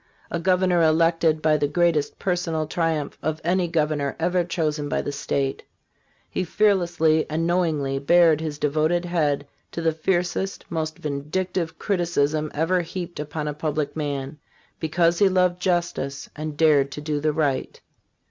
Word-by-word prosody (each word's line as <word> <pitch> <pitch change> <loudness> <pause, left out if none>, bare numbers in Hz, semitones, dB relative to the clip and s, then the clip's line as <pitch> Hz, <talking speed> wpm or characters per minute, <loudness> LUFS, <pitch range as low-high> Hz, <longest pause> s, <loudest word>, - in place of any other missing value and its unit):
A 170 - -1
Governor 180 0 +2
elected 165 0 +3
by 155 -1 +4
the 145 - +1
great 170 +2 +2
est 150 -1 -2
personal 175 -4 -1
triumph 160 -2 -2
of 155 +1 -2
any 180 +2 +1
Governor 150 -4 0
ever 175 +2 +1
chosen 155 -4 -2
by - - 0
the - - -3
State, 140 -1 -2 0.7
he 185 - -2
fearlessly 175 -5 +2
and 160 +2 -1
knowingly 155 -6 0
bared 160 +1 +4
his 155 -2 -4
devoted 155 +4 +1
head 150 -5 0 0.3
to - - -5
the 165 -1 +2
fiercest, 175 +4 -1
most 160 -1 -2
vindictive 160 +4 -3
criticism 155 -5 0
ever 170 +4 +2
heaped 175 0 -6
upon 150 0 -4
a 150 - -2
public 150 -1 -2
man, 145 -1 -4 0.4
because 170 +2 +1
he 200 - +5
loved 180 -1 +2
justice 175 -6 -1
and 155 0 -5
dared 150 -4 +4
to 150 - -6
do 150 -1 -2
the 155 +1 +1
right. 145 -3 -1
160 Hz, 155 wpm, -24 LUFS, 150-175 Hz, 0.7 s, he